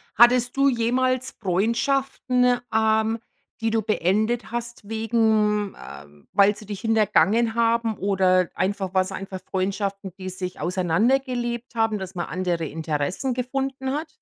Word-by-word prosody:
Hattest 245 +2 +5
du 275 0 +4
jemals 255 +2 +1
Freundschaften, 250 +5 +1 0.2
ähm, 220 +1 +2 0.4
die 225 - 0
du 225 0 +1
beendet 215 +3 0
hast 235 -3 -5
wegen, 220 -2 +1
äh 70 +1 -10 0.3
weil 200 +1 +4
sie 210 - -11
dich 205 -2 -6
hintergangen 225 +1 +2
haben 230 -1 +1
oder 185 -2 +2
einfach 190 0 -2
waren 185 - +4
es 190 +1 -6
einfach 190 -1 -6
Freundschaften, 195 0 -2
die 185 0 -6
sich 180 0 -6
auseinandergelebt 240 - 0
haben, 225 -2 +1
dass 190 0 -7
man 175 -1 -3
andere 175 -3 -2
Interessen 160 - -2
gefunden 265 +1 -3
hat? 305 +2 -3
220 Hz, 135 wpm, -24 LUFS, 190-240 Hz, 0.4 s, Hattest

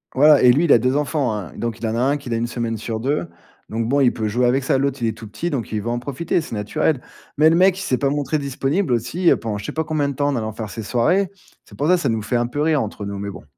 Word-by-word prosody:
Ouais 145 -1 +6
et - - +9
lui 150 +6 +2
il 155 - +2
a - - +8
2 125 +4 +1
enfants, 145 -4 0
hein, 100 -6 -5
donc 115 -1 -3
il 115 - -2
en 110 - -1
a - - 0
1 135 +3 +2
qu'il 135 -5 -5
a - - 0
1 120 +1 -1
semaine 115 -1 -3
sur 110 +1 -4
2. 145 +6 -1 0.4
Donc 115 +1 -2
bon, 140 +2 +2
il 125 -3 +4
peut 110 -1 -2
jouer 125 +4 +1
avec 130 +2 +2
ça. 135 - +2
L'autre 135 -1 -1
il 115 - +1
est 110 - +1
tout 110 - -9
petit, 110 +12 -4
donc 120 -7 -4
il 105 - -1
veut 115 - -4
en 120 0 -1
profiter, 140 +7 -1
c'est 155 -8 -6
naturel. 125 +7 0 0.4
Mais 155 +1 +6
le 165 - +3
mec, 185 +1 +4
il - - -5
s'est 130 - 0
pas 140 - +1
montré 145 +2 -1
disponible 140 +3 -1
aussi, 165 +10 +1
heu, - - +6
pendant 110 -3 -4
je 100 - -7
sais - - -5
pas 160 - -1
combien 155 -3 -1
de 140 - -2
temps, 145 +2 0
en 140 - -1
allant 110 -1 -3
faire 110 0 -6
ses 110 +3 -6
soirées. 170 - +1 0.4
C'est - - -15
pour 145 - 0
ça, 180 0 +5
ça 160 - -1
nous 110 -2 0
fait 120 +3 -1
un 120 0 0
peu 145 +4 -3
rire 155 -2 +2
entre 105 -1 -5
nous, 100 0 -5
mais 100 0 -4
bon. 100 - -9
125 Hz, 325 wpm, -21 LUFS, 115-145 Hz, 0.4 s, et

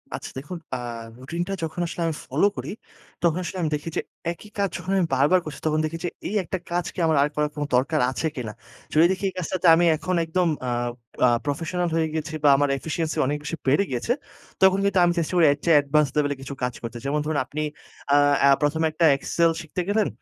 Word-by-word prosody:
আচ্ছা - - -7
দেখুন 170 +6 -7 0.2
আ - - -2 0.4
রুটিন 155 +7 -4
টা 195 - -3
যখন 160 +2 -4
আসলে 175 - -5
আমি 160 - -1
ফলো 150 +10 +2
করি, - - -4 0.5
তখন 170 0 +3
আসলে 180 +2 -5
আমি 160 - 0
দেখি 150 +3 -5
যে - - +2 0.3
একই 205 +5 -11
কাজ 200 -1 +1
যখন 190 - -5
আমি 185 - +3
বারবার 145 +8 +4
করছি 150 -2 -7
তখন 155 0 +2
দেখি 165 +2 -4
যে, 175 - 0 0.2
"এই 215 - -3
একটা 185 +2 -3
কাজ 175 0 0
কি - - -7
আমার 160 -2 +3
আর 145 - +1
করার 150 0 +1
কোন 150 - -2
দরকার 145 +5 +2
আছে 160 - -1
কিনা?" 115 -5 -5 0.4
যদি 155 +2 +6
দেখি 190 +1 -3
এই - - -11
কাজটাতে 185 +1 -1
আমি 175 +1 +3
এখন 185 +3 -2
একদম 175 +2 +1 0.2
আ - - 0 0.6
আ - - +5 0.2
প্রফেশনাল 170 +4 -1
হয়ে 160 -1 +2
গেছি 155 0 -3
বা 145 - +6
আমার 145 0 +2
efficiency 160 +2 -3
অনেক 145 +2 0
বেশি 155 +3 -3
বেড়ে 145 +9 +4
গিয়েছে। 125 - 0 0.5
তখন 190 0 +6
কিন্তু 195 -2 +3
আমি 175 - +2
চেষ্টা 165 +2 -2
করি 170 -2 +5
এর 145 - -1
চেয়ে 165 -3 +6
advanced 145 -1 +2
level 145 -1 +2
এ - - -9
কিছু 135 +1 -6
কাজ 125 -1 0
করতে। 115 0 -6
যেমন 145 +2 0
ধরুন 155 -1 -1
আপনি 155 +4 -4 0.5
আ - - +7 0.3
এ - - +7
১ম 145 +2 +1
এ - - +4
একটা 165 +2 +2
excel 165 +4 +2
শিখতে 165 +3 -4
গেলেন, 210 0 +2
160 Hz, 230 wpm, -24 LUFS, 145-175 Hz, 0.6 s, আ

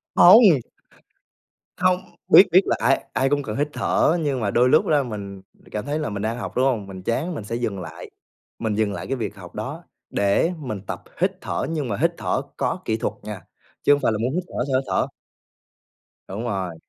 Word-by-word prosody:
Hông. 180 - +8 1.2
Hông, 180 0 +3 0.3
biết 195 - +9
biết 185 - +7
là - - +2
ai 135 +3 +2
ai 135 +1 +1
cũng 145 -1 +1
cần 105 -2 -4
hít 145 +1 +1
thở, 165 +3 +2
nhưng 140 -4 0
mà 100 -3 -1
đôi 125 +1 +4
lúc 155 - +5
ra 145 -3 +3
mình 100 -4 -7 0.3
cảm 105 +3 -4
thấy 150 +2 -2
là 150 - -2
mình 100 -1 -4
đang 115 +2 -1
học, - - -6
đúng 130 +2 +3
hông? 110 -7 0
Mình 95 -1 -9
chán 150 - -1
mình 110 - -5
sẽ 115 +3 -4
dừng 110 -5 -2
lại 85 - -9 0.5
mình 110 -2 -1
dừng 105 -1 0
lại - - -6
cái 135 - -1
việc 105 -4 -4
học 90 -3 -12
đó - - -5 0.3
để 100 - +2
mình 110 -10 -5
tập - - -5 0.2
hít - - +3
thở, - - -2
nhưng 155 -5 -2
mà 100 - -2
hít - - +4
thở - - -1 0.2
có - - -1
kỹ 110 - 0
thuật - - -2
nha, 105 -4 -6 0.4
chứ 145 - +6
hông 145 - 0
phải - - +2
là 110 - -1
muốn 125 +3 -1
hít 180 +2 -1
thở 125 - -3
sao 130 - +3
hít 135 - -7
thở. - - +1 1.2
Đúng 105 +5 -5
rồi. 95 -7 -3
120 Hz, 225 wpm, -23 LUFS, 105-145 Hz, 1.2 s, biết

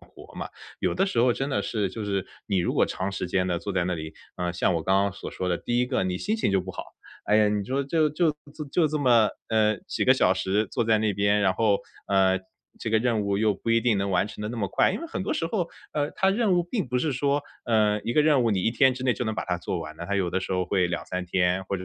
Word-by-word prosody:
活 - - -16
嘛。 - - -5 0.3
有 - - 0
的 195 - +2
时 160 - -2
候 120 +1 +4
真 135 +3 -3
的 135 - +1
是 105 -3 -1
就 110 +2 -5
是 100 -2 -2 0.2
你 100 -3 +1
如 85 - 0
果 - - +3
长 95 +1 -3
时 95 - -3
间 90 +1 0
地 90 -2 0
坐 100 +3 -5
在 90 -2 +1
那 90 - -1
里， 80 -1 -7 0.2
啊， 90 -1 -2
像 90 +1 +1
我 80 - -1
刚 95 +3 +3
刚 100 -1 0
所 - - -8
说 90 - -3
的， 85 - 0
第 120 0 0
一 125 - +1
个 130 - 0
你 90 -1 -1
心 215 - -1
情 220 - 0
就 95 -1 +2
不 95 - -7
好。 - - -6 0.4
哎 105 - +3
呀， 105 -1 +4
你 105 -1 -1
说 135 +6 -1
就 155 +3 +2
就 160 +2 +2 0.4
就 170 -3 +3
这 150 0 -1
么， 120 -6 +4 0.2
呃， 110 -1 +2
几 - - -1
个 - - +6
小 - - +3
时 105 +3 0
坐 120 +3 -1
在 110 -1 +3
那 105 -1 +1
边， 100 +1 +2
然 95 -2 +3
后， 105 -1 +2 0.3
呃， 95 -1 +3 0.4
这 - - -4
个 110 - +4
任 115 -2 +1
务 100 0 0
又 110 0 +3
不 115 - -4
一 115 0 +4
定 115 -3 +2
能 100 0 -1
完 95 +2 +1
成 105 - -8
得 105 - -3
那 120 - -5
么 100 -4 -1
快。 - - +2
因 - - -4
为 335 - -5
很 315 - -4
多 - - -1
时 165 - -1
候， 175 -1 -1 0.2
呃， 145 -1 -1
它 195 - +2
任 210 0 +2
务 175 -1 +3
并 175 - -3
不 125 +1 0
是 150 +1 0
说， 140 +3 +1 0.2
呃， 105 -2 +2
一 115 - -2
个 150 - +4
任 145 -5 +4
务 115 - +2
你 95 -3 0
1 - - +2
天 130 +3 +4
之 130 - -7
内 125 -2 +2
就 120 - -3
能 110 0 -2
把 - - -3
它 90 - 0
做 90 0 -4
完 80 -1 -8
的， 85 - -6
它 100 - -1
有 95 -3 +1
的 95 - 0
时 95 - -4
候 90 0 0
会 90 -2 +2
2-3 90 +1 -4
天， 90 +1 +1
或 100 - -2
者 95 - -7
105 Hz, 315 characters per minute, -26 LUFS, 95-125 Hz, 0.4 s, 个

